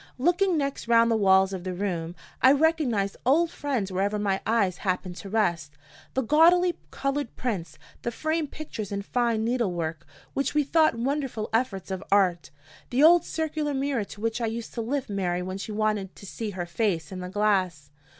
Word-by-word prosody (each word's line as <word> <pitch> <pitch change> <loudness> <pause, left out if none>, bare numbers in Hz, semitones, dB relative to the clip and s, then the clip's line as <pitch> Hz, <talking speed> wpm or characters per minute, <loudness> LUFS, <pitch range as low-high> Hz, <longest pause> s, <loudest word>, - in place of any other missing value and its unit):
Looking 350 +6 +2
next 280 -4 -2
round 230 0 +5
the - - +3
walls 190 -2 +4
of 185 -2 -5
the 185 -1 -4
room, 175 -3 -3 0.3
I 260 +1 +7
recognized 280 -10 +1
old 325 +7 +3
friends 255 - -2
wherever 200 +3 0
my 200 -2 0
eyes 200 -5 +2
happened 185 -2 -2
to 200 - -8
rest 170 -9 0 0.4
the 265 - +1
gaudily 345 +7 +4
colored 275 -2 -3
prints; 175 - -3 0.2
the - - -2
framed 315 +5 -2
pictures 225 -11 -7
in 200 0 -3
fine 230 0 0
needle 235 -4 0
work, 165 -1 -4 0.3
which 275 +2 -1
we 300 - +4
thought 310 0 +3
wonderful 260 -2 -2
efforts 220 -6 -1
of 190 0 -4
art; 185 -4 +2 0.4
the 260 +4 +2
old 340 +2 +7
circular 310 -2 -2
mirror 270 -4 0
to 205 - -11
which 225 +1 -1
I 230 - +1
used 225 +1 -5
to 235 - -3
lift 265 +4 -2
Mary 180 -3 -1
when 185 +1 -5
she 215 - -5
wanted 210 -3 -1
"to - - -12
see 215 +3 -5
her 185 -3 -4
face 170 -3 -1
in 185 - -6
the 180 0 -5
glass." 185 -8 0
220 Hz, 190 wpm, -26 LUFS, 190-275 Hz, 0.4 s, I